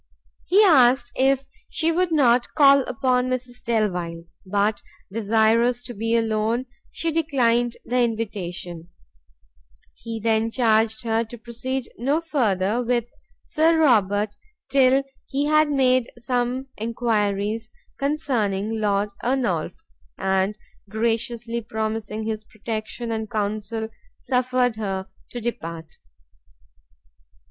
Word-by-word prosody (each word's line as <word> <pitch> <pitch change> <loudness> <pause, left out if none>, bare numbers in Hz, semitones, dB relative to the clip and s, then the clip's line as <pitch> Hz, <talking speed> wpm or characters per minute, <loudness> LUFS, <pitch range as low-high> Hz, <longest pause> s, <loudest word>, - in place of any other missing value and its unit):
He 400 +4 +5
asked 255 -8 +5
her 260 - +1
if 270 0 -7 0.2
she 330 0 +1
would 350 +1 +1
not 250 -6 +3
call 280 -2 +7
upon 250 +1 +1
Mrs 250 -1 -4
Delvile; 180 -8 -1 0.2
but 205 +2 +1 0.3
desirous 225 +3 +2
to 245 - -7
be 225 +2 0
alone, 225 +2 0 0.2
she 330 - -1
declined 245 -7 +1
the 250 +1 0
invitation; 195 -7 -3 1.0
he 230 -1 -6
then 225 0 +1
charged 220 -2 +2
her 225 0 +1
to 240 +2 -10
proceed 245 +3 -4
no 275 +6 +1
further 230 - 0
with 240 -1 0 0.4
Sir 325 +1 +2
Robert 210 -8 +3 0.4
till 270 0 +4 0.2
he 280 +2 -1
had 305 0 +4
made 255 -3 +2
some 245 +1 -1
enquiries 220 -1 -1 0.3
concerning 225 -8 -1
Lord 205 0 +1
Ernolf, 240 -11 0 0.4
and 190 +2 0 0.3
graciously 230 +2 -1
promising 220 -1 -3
his 215 -1 -3
protection 220 +2 -5
and 220 -1 -3
counsel, 215 0 -2 0.3
suffered 250 -2 0
her 195 -3 -3 0.2
to 245 - -6
depart. 165 -8 -5
230 Hz, 110 wpm, -23 LUFS, 215-255 Hz, 1.0 s, call